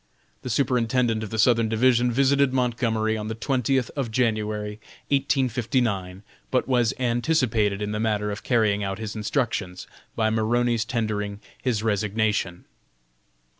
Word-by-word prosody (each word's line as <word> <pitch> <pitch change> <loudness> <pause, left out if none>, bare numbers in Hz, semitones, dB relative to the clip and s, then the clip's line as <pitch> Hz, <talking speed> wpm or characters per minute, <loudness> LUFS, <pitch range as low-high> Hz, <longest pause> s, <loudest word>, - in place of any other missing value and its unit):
The - - -6
Superintendent 120 -2 +1
of 110 - -5
the 110 - -4
Southern 115 0 +3
Division 120 +2 +3
visited 140 +2 +3
Montgomery 115 -3 0
on 105 -1 -4
the 110 - -4
twentieth 130 +1 0
of 135 -5 -2
January, 110 -2 -1 0.3
1859, 120 -8 0 0.3
but 130 - 0
was 120 -3 +2
anticipated 120 -5 +1
in 105 - -3
the 105 - -2
matter 105 -2 0
of 100 - -5
carrying 110 -4 +1
out 95 0 -3
his 110 -1 -6
instructions, 105 -5 -2 0.3
by 110 -1 +1
Maroney's 115 +1 +1
tendering 105 -3 -2 0.2
his 115 -5 -1
resignation. 105 -3 -1
110 Hz, 130 wpm, -24 LUFS, 105-125 Hz, 0.3 s, Southern